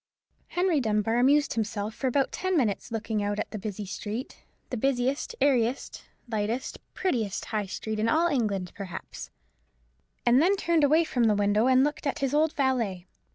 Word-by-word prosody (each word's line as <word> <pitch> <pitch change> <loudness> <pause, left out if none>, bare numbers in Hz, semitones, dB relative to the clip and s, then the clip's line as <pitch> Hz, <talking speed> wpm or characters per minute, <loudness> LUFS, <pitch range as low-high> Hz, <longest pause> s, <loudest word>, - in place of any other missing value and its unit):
Henry 355 -3 +1
Dunbar 220 -1 +1
amused 285 +4 +4
himself 215 -1 -2
for 265 - -2
about 270 +2 +1
ten 370 -1 -1
minutes 230 -4 0
looking 225 -1 -2
out 205 0 -1
at - - -3
the 215 - -5
busy 210 0 -5
street—the 215 +6 -7
brightest, 265 +2 0
airiest, 260 -3 +1 0.2
lightest, 225 +2 -2 0.2
prettiest 230 - -1
High 210 -2 -2
Street 215 +3 -4
in 220 +1 +1
all 325 +6 +3
England, 205 - -1
perhaps; 195 -3 -8 1.0
and 245 +3 +5
then 375 +5 +4
turned 335 -5 +1
away 310 +4 +5
from 245 -7 0
the 215 -2 +4
window 205 +3 +2
and 260 0 +5
looked 295 +1 -1
at 280 - -1
his 275 0 -1
old 310 +1 +3
valet. 235 -10 0
240 Hz, 165 wpm, -27 LUFS, 210-280 Hz, 1.0 s, and